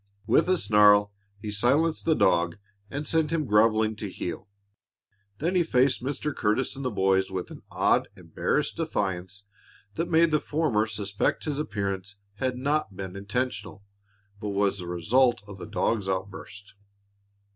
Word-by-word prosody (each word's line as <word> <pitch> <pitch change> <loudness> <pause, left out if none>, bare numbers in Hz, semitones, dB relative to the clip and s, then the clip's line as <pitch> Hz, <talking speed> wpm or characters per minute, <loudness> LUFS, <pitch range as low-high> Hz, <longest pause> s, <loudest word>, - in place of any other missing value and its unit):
With - - +3
a 185 - +4
snarl 105 -5 +5 0.2
he 105 +1 -6
silenced 140 +10 +1
the 160 - +3
dog 85 - +2 0.3
and 145 +5 -5
sent 160 -1 +1
him 160 -2 0
groveling 110 0 +3
to 105 -1 -5
heel. 95 +2 -6 0.9
Then 165 - -1
he 180 - +3
faced 130 -5 +2
Mr. 140 +2 -3
Curtis 110 +5 0
and 135 - -7
the 130 - 0
boys 95 -2 +1
with 95 -2 -5
an - - -10
odd, - - +2
embarrassed - - -2
defiance 95 0 -3 0.5
that 165 +1 -2
made 165 0 +4
the 150 - +3
former 145 -10 0
suspect 100 -2 -2
his 150 -2 -2
appearance 100 -6 -3 0.2
had 130 +1 -1
not 140 -6 -1
been 95 -1 -6
intentional, 100 -1 -4 0.6
but 105 -1 -4
was 100 -1 0
rather 90 - -7
the 90 - -4
result 120 +7 +2
of 100 -2 -10
the - - -7
dog's 100 0 -1
outburst. 95 +1 -6
105 Hz, 155 wpm, -26 LUFS, 100-135 Hz, 0.9 s, snarl